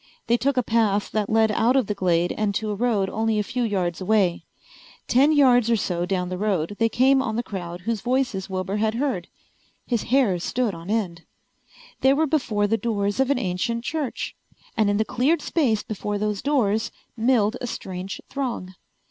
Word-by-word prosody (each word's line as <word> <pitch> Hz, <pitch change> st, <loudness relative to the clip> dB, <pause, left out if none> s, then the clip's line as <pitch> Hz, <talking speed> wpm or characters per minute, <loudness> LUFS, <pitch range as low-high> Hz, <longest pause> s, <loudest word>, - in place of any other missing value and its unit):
They 235 Hz, -, +3 dB
took 270 Hz, +2 st, 0 dB
a 250 Hz, -, +3 dB
path 220 Hz, -3 st, +1 dB
that 215 Hz, -2 st, -1 dB
led 220 Hz, 0 st, +3 dB
out 230 Hz, +4 st, +2 dB
of 265 Hz, -4 st, +3 dB
the 210 Hz, -, -2 dB
glade 175 Hz, -3 st, +1 dB
and 210 Hz, -2 st, -1 dB
to 215 Hz, 0 st, -1 dB
a -, -, -2 dB
road 215 Hz, -3 st, +1 dB
only 220 Hz, +2 st, 0 dB
a 210 Hz, -, +1 dB
few 250 Hz, +4 st, -3 dB
yards 190 Hz, -6 st, -1 dB
away. 190 Hz, -3 st, +1 dB, 0.6 s
Ten 275 Hz, +5 st, +4 dB
yards 250 Hz, -6 st, +5 dB
or 230 Hz, -, +4 dB
so 180 Hz, -4 st, -1 dB
down 180 Hz, -1 st, -1 dB
the 185 Hz, 0 st, -4 dB
road 200 Hz, -3 st, -1 dB
they 225 Hz, 0 st, +3 dB
came 265 Hz, +3 st, +4 dB
on 220 Hz, -4 st, -2 dB
the 235 Hz, -, -1 dB
crowd 175 Hz, -4 st, -6 dB
whose 225 Hz, +2 st, -2 dB
voices 250 Hz, -7 st, -1 dB
Wilbur 190 Hz, +1 st, -2 dB
had 220 Hz, +1 st, 0 dB
heard. 240 Hz, -9 st, -1 dB, 0.6 s
His 235 Hz, -4 st, 0 dB
hair 240 Hz, -9 st, +3 dB
stood 235 Hz, +4 st, -1 dB
on 165 Hz, +2 st, -9 dB
end. 190 Hz, -7 st, -1 dB, 0.8 s
They 265 Hz, +1 st, +4 dB
were 315 Hz, +2 st, +2 dB
before 245 Hz, -9 st, 0 dB
the 225 Hz, +2 st, +1 dB
doors 205 Hz, -2 st, -1 dB
of 265 Hz, 0 st, +2 dB
an 280 Hz, -, +2 dB
ancient 230 Hz, +3 st, -2 dB
church. 295 Hz, -2 st, -3 dB, 0.4 s
And 215 Hz, -2 st, +2 dB
in 205 Hz, -, +1 dB
the 220 Hz, -, +1 dB
cleared 270 Hz, +8 st, +1 dB
space 240 Hz, -10 st, +1 dB
before 210 Hz, -1 st, -3 dB
those 210 Hz, -1 st, -2 dB
doors 225 Hz, -7 st, +1 dB, 0.3 s
milled 230 Hz, -1 st, +2 dB
a 245 Hz, -, -3 dB
strange 190 Hz, -3 st, -6 dB
throng. 245 Hz, -9 st, -4 dB
220 Hz, 195 wpm, -24 LUFS, 195-245 Hz, 0.8 s, yards